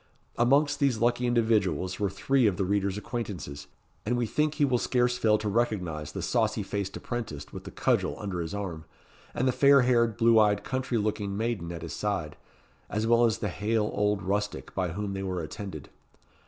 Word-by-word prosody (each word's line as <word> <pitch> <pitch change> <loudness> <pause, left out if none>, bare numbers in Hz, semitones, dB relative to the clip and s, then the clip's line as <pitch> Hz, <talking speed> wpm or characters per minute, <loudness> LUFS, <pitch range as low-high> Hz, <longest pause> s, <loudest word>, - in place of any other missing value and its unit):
Amongst 140 +4 +3
these 140 -5 +2
lucky 120 +2 +1
individuals 100 -7 +1
were 100 -1 +1
three 125 +5 +2
of 95 -4 0
the 95 - 0
reader's 100 0 0
acquaintances, 100 - -5 0.4
and 120 +3 0
we 120 - +1
think 150 +6 0
he 150 - +3
will 125 -3 +1
scarce 125 0 +1
fail 110 -3 +3
to 105 - -4
recognise 90 -9 -1
the - - -5
saucy - - +1
faced 100 -2 -3
apprentice 105 - -5
with - - -8
the - - -6
cudgel - - 0
under 100 -4 -4
his 85 +4 -4
arm, 90 -6 -5 0.5
and 130 - +1
the - - +4
fair 140 +1 +6
haired, 115 -3 +2
blue 115 -1 +5
eyed, 105 -1 +3
country 130 -2 -2
looking 105 -2 -1
maiden 110 -7 -2
at 85 -1 -7
his 85 - -6
side, 100 -8 -2 0.5
as 105 +1 -1
well 120 +1 +5
as 115 -1 +1
the 105 -2 -2
hale 105 +3 0
old 105 -2 +1
rustic 100 -7 -2
by 95 -2 0
whom 100 +4 -4
they 95 - -4
were 90 -3 -3
attended. 80 -2 -7
105 Hz, 195 wpm, -28 LUFS, 95-120 Hz, 0.5 s, fair